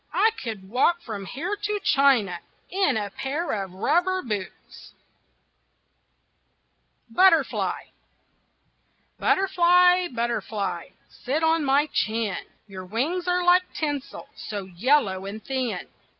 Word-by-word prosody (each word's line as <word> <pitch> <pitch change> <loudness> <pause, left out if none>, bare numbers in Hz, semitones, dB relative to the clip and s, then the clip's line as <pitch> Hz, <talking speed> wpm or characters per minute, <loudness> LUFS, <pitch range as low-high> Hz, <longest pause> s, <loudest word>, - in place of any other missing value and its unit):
I 445 - +4
could 215 -6 -6
walk 335 - +1
from 200 -4 -6
here 345 - -3
to 415 0 -2
China 250 - +3 0.3
In 370 - +1
a 205 -2 -3
pair 290 - -3
of 195 -3 -3
rubber 355 - +1
boots. 210 -5 -7 2.2
BUTTERFLY 330 +1 +2 1.3
Butterfly, 360 -1 +4
butterfly, 230 - -3 0.2
Sit 295 +6 -3
on 320 0 +3
my 280 +1 +3
chin, 220 -3 -1 0.2
Your 190 -2 -8
wings 310 - -2
are 360 0 +1
like 360 +1 +4
tinsel, 290 -3 -4
So 205 -2 -6
yellow 190 0 +1
and 215 +2 -8
thin. 260 -3 -3
270 Hz, 105 wpm, -25 LUFS, 210-350 Hz, 2.2 s, I